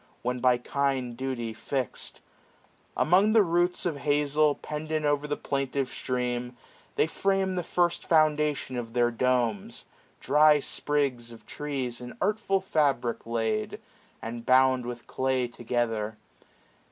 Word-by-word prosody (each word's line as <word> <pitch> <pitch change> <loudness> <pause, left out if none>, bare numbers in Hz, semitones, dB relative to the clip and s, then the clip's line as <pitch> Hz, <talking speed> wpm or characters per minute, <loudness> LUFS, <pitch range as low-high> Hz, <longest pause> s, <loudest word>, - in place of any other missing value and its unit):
When 125 +1 -1
by 125 -1 +4
kind 130 -1 -1
duty 120 -3 -3
fix'd. 130 +2 -4 0.8
Among 195 +6 +4
the 220 -2 +6
roots 175 0 +1
645 170 -4 -1
Of 140 - -9 0.2
hazel, 150 0 +3
pendant 155 0 -4
o'er 145 0 +1
the 145 - -2
plaintive 135 -1 -2
stream. 125 -1 -3 0.4
They - - +3
frame 195 +3 0
the 180 - -1
first 175 0 0
foundation 150 -4 +2
of 115 -2 -5
their 120 -1 +2
domes 120 -4 0
j - - -32 0.4
Dry 150 +2 +6
sprigs 135 -5 -1
of 115 - -14
trees, 135 -5 -4
in 125 0 -9
artful 200 -1 0
fabric 140 -11 0
laid. 110 -2 -1 0.4
And 115 +1 -5
bound 130 0 +4
with 120 -1 -7
clay 130 -1 0
together. 115 -3 -2
130 Hz, 135 wpm, -27 LUFS, 120-150 Hz, 0.8 s, the